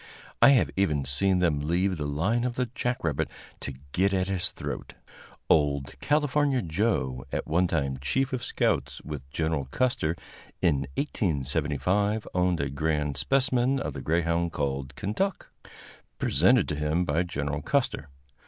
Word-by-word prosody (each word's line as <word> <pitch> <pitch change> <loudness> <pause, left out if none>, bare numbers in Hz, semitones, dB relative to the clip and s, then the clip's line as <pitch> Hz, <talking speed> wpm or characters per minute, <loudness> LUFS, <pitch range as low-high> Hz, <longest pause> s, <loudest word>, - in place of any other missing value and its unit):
I - - +9
have 125 - +3
even 75 -8 +1
seen 95 +8 +3
them 85 -5 +2
leave 90 +5 0
the 75 -2 -2
line 95 +12 0
of 125 -1 -1
the 125 -2 -2
jack 125 0 -2
rabbit 75 -4 0 0.3
to 70 - -6 0.2
get 95 +4 +2
at 95 0 +1
his 95 -3 +1
throat. - - -6 0.5
Old 70 -3 +2
"California 145 -3 +2
Joe," 80 - 0
at - - -2
one 90 +3 +2
time 70 -6 -1
chief 130 - 0
of 125 -2 -2
scouts - - 0
with 70 -3 -7
Gen. 80 0 -1
Custer, 85 - 0 0.4
in 75 -8 +1
1875 90 - 0
owned 90 -1 +2
a 70 -1 -1
grand 75 0 -1
specimen 130 - +2
of - - -3
the - - -6
greyhound 85 +3 +1
called 70 -2 -3
Kentuck, 115 - -2 0.7
presented 95 - +3
to 75 - -1
him 75 +4 0
by 80 +1 +1
Gen. 75 -4 -3
Custer. 115 - 0
85 Hz, 150 wpm, -27 LUFS, 75-110 Hz, 0.7 s, I